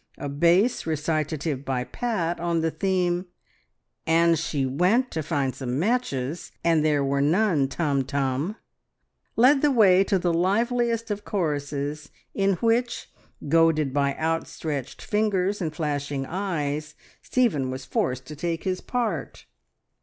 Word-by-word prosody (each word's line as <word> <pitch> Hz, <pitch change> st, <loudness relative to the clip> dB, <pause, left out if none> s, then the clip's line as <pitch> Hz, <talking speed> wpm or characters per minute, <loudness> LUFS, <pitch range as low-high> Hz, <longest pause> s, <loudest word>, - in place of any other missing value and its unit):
A -, -, -5 dB
bass 170 Hz, -, +2 dB
recitative 155 Hz, -2 st, -1 dB
by 130 Hz, -2 st, -1 dB
Pat, 175 Hz, -, -2 dB
on 170 Hz, -1 st, 0 dB
the 165 Hz, 0 st, 0 dB
theme 180 Hz, -1 st, 0 dB, 0.8 s
"And 165 Hz, 0 st, +4 dB
she 145 Hz, -4 st, -1 dB
went 185 Hz, -, +2 dB
to 160 Hz, -, -2 dB
find 145 Hz, -4 st, -1 dB
some 130 Hz, -1 st, -3 dB
mat 230 Hz, -, +2 dB
ches. 140 Hz, -, -5 dB
And 165 Hz, -2 st, +3 dB
there 150 Hz, -2 st, +2 dB
were 140 Hz, 0 st, +1 dB
none... 160 Hz, -2 st, +2 dB
Tum 140 Hz, -2 st, 0 dB
Tum!" 140 Hz, +6 st, -1 dB, 0.8 s
led 265 Hz, +4 st, +5 dB
the 295 Hz, -, +4 dB
way 195 Hz, -7 st, +5 dB
to 195 Hz, -, +2 dB
the 175 Hz, -2 st, 0 dB
liveliest 230 Hz, +5 st, +1 dB
of 205 Hz, 0 st, -3 dB
choruses, 145 Hz, -4 st, -2 dB, 0.2 s
in 195 Hz, 0 st, +2 dB
which, 230 Hz, +5 st, 0 dB, 0.4 s
goaded 155 Hz, -3 st, +3 dB
by 140 Hz, -1 st, +1 dB
outstretched 160 Hz, -3 st, -3 dB
fingers 205 Hz, -2 st, 0 dB
and 160 Hz, -3 st, -1 dB
flashing 145 Hz, -3 st, -2 dB
eyes, 155 Hz, -5 st, -3 dB, 0.3 s
Stephen 185 Hz, -, +1 dB
was 130 Hz, +1 st, -5 dB
forced 130 Hz, 0 st, -1 dB
to 150 Hz, -, -8 dB
take 165 Hz, +2 st, -3 dB
his 185 Hz, -1 st, -2 dB
part. 245 Hz, -3 st, -3 dB
165 Hz, 140 wpm, -25 LUFS, 145-195 Hz, 0.8 s, led